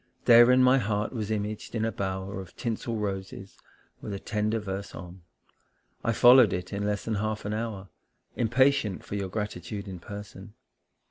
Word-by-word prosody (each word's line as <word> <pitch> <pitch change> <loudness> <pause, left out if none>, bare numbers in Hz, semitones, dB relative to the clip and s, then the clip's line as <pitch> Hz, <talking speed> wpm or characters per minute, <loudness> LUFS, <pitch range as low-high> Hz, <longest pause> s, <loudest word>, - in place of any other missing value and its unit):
Therein 120 +2 +7
my 130 +1 +5
heart 105 0 -1
was 110 -4 -3
imaged 105 +1 -3
in 110 -1 0
a 115 - -1
bower 95 0 -4
Of 95 - -13
tinsel 115 0 -3
roses, 95 -2 -5 0.4
with 100 - -5
a - - -6
tender 105 +2 -1
verse 100 -2 -5
on; 90 +1 -10 0.8
I 115 - +1
followed 120 0 +7
it 90 +2 -4
in 100 +1 -2
less 105 -1 -2
than 115 - -1
half 110 -1 -3
an 105 - -2
hour 110 -3 -4 0.5
Impatient 120 -3 +2
for - - -8
your 100 -2 -2
gratitude 105 0 -5
in 95 -2 -7
person. 105 +2 -10
105 Hz, 170 wpm, -27 LUFS, 95-115 Hz, 0.8 s, Therein